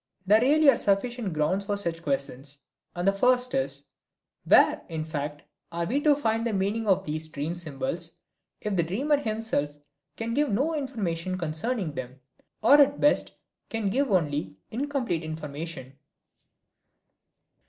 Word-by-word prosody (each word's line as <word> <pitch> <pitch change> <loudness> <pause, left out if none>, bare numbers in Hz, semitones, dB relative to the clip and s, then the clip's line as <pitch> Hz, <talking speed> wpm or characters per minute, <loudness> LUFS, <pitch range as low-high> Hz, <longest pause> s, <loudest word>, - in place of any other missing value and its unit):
There 210 +3 +5
really 300 +4 +4
are 235 - 0
sufficient 215 +1 0
grounds 155 +6 0
for 205 0 -1
such 170 -4 -2
questions, 140 -1 -2 0.4
and 175 +2 -1
the 195 - +5
first 250 +4 +3
is, 265 -1 -1 0.6
"Where, - - +5
in 160 -2 -3
fact, 150 -1 -5 0.3
are 170 0 -2
we 265 +10 0
to 295 -1 +5
find 225 -5 0
the 230 -2 -1
meaning 205 +3 -1
of 190 -1 +3
these 155 +1 -2
dream 155 +2 -4
symbols 175 - -3 0.4
if 210 -2 -2
the 175 - +3
dreamer 255 - +1
himself 215 - -2 0.4
can 230 0 -3
give 290 +2 +2
no 275 +11 +1
information 190 - -2
concerning 170 - -2
them, 130 -1 -7 0.4
or 290 +1 +8
at 285 0 +3
best 290 - +3 0.4
can 220 -4 -1
give 275 +4 +1
only 145 - 0
incomplete 245 - -2
information?" 155 -3 -6
195 Hz, 145 wpm, -27 LUFS, 155-245 Hz, 0.6 s, or